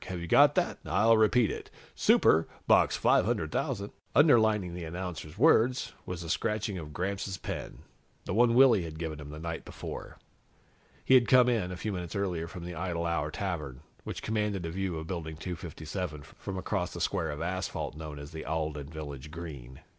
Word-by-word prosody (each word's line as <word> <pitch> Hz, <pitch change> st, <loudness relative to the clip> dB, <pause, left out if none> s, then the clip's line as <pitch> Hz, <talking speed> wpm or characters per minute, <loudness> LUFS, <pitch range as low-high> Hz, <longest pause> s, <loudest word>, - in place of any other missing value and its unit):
Have 90 Hz, -1 st, -4 dB
you 85 Hz, -, -5 dB
got -, -, +6 dB
that? -, -, 0 dB
I'll 115 Hz, +1 st, +4 dB
repeat 110 Hz, 0 st, +4 dB
it. -, -, -7 dB, 0.2 s
'Super,' 80 Hz, +1 st, +4 dB, 0.2 s
Box -, -, +5 dB
500,000 100 Hz, +1 st, +1 dB
..." -, -, -34 dB
Underlining 110 Hz, -, +4 dB
the 90 Hz, 0 st, -5 dB
announcer's 85 Hz, -1 st, -6 dB
words 125 Hz, -2 st, +4 dB
was 90 Hz, -2 st, -4 dB
the 85 Hz, -, -7 dB
scratching 105 Hz, -2 st, -1 dB
of 75 Hz, -2 st, -8 dB
Gramps' 95 Hz, +3 st, -3 dB
pen, -, -, -6 dB, 0.4 s
the -, -, -3 dB
one 120 Hz, +2 st, +4 dB
Willy 125 Hz, -6 st, +7 dB
had 80 Hz, -2 st, -6 dB
given 80 Hz, -2 st, -4 dB
him 75 Hz, -1 st, -8 dB
the 75 Hz, -, -8 dB
night 80 Hz, +1 st, -5 dB
before. -, -, -8 dB, 0.9 s
He -, -, +4 dB
had 125 Hz, -2 st, +6 dB
come 125 Hz, -1 st, +6 dB
in, 110 Hz, -7 st, +1 dB
a 90 Hz, -, -5 dB
few 105 Hz, +2 st, -3 dB
minutes 90 Hz, -2 st, -5 dB
earlier, 90 Hz, -5 st, -1 dB
from 85 Hz, 0 st, -8 dB
the 90 Hz, -, -5 dB
Idle 85 Hz, 0 st, -2 dB
Hour 80 Hz, -3 st, 0 dB
Tavern, 75 Hz, -7 st, -4 dB, 0.2 s
which -, -, -6 dB
commanded 105 Hz, -4 st, -1 dB
a 80 Hz, -, -3 dB
view 95 Hz, -1 st, -2 dB
of 80 Hz, -, -5 dB
Building 80 Hz, -3 st, -5 dB
257 80 Hz, -2 st, -5 dB
from 95 Hz, +6 st, -7 dB
across 95 Hz, -1 st, -2 dB
the 85 Hz, -, -6 dB
square 85 Hz, -1 st, 0 dB
of 75 Hz, 0 st, -4 dB
asphalt 95 Hz, -2 st, -3 dB
known 75 Hz, -1 st, -7 dB
as 70 Hz, 0 st, -9 dB
the 80 Hz, -, -6 dB
Alden 75 Hz, -2 st, -3 dB
Village 75 Hz, -2 st, -7 dB
Green. 75 Hz, -6 st, -8 dB
90 Hz, 185 wpm, -30 LUFS, 80-100 Hz, 0.9 s, Willy